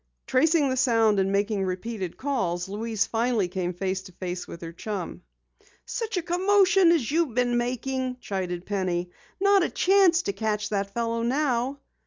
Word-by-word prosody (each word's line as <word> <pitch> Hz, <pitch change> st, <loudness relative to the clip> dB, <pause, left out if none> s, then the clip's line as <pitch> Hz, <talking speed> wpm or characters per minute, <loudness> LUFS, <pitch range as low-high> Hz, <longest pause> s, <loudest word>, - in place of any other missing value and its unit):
Tracing 300 Hz, +1 st, +3 dB
the 260 Hz, -, -1 dB
sound, 225 Hz, -5 st, +3 dB
and 195 Hz, 0 st, +1 dB
making 200 Hz, 0 st, 0 dB
repeated 185 Hz, 0 st, -4 dB
calls, 190 Hz, -11 st, -1 dB
Louise 215 Hz, +1 st, -1 dB
finally 230 Hz, -4 st, 0 dB
came 180 Hz, 0 st, -2 dB
face 185 Hz, +1 st, -2 dB
to 190 Hz, -, -13 dB
face 180 Hz, 0 st, -5 dB
with 170 Hz, -, -9 dB
her 165 Hz, -1 st, -6 dB
chum. 190 Hz, -1 st, -5 dB, 0.6 s
"Such 455 Hz, -4 st, -3 dB
a 355 Hz, -, -1 dB
commotion 380 Hz, +1 st, +4 dB
as 290 Hz, -8 st, +1 dB
you've 315 Hz, -7 st, +1 dB
been 245 Hz, -1 st, +2 dB
making," 255 Hz, +1 st, -2 dB
chided 185 Hz, -5 st, -4 dB
Penny. 180 Hz, -3 st, -2 dB, 0.3 s
"Not 400 Hz, 0 st, +4 dB
a 345 Hz, -, +1 dB
chance 370 Hz, -2 st, +4 dB
to 200 Hz, -, -2 dB
catch 210 Hz, +1 st, -2 dB
that 200 Hz, -1 st, -2 dB
fellow 230 Hz, 0 st, -1 dB
now!" 260 Hz, +1 st, 0 dB
230 Hz, 165 wpm, -26 LUFS, 190-280 Hz, 0.6 s, commotion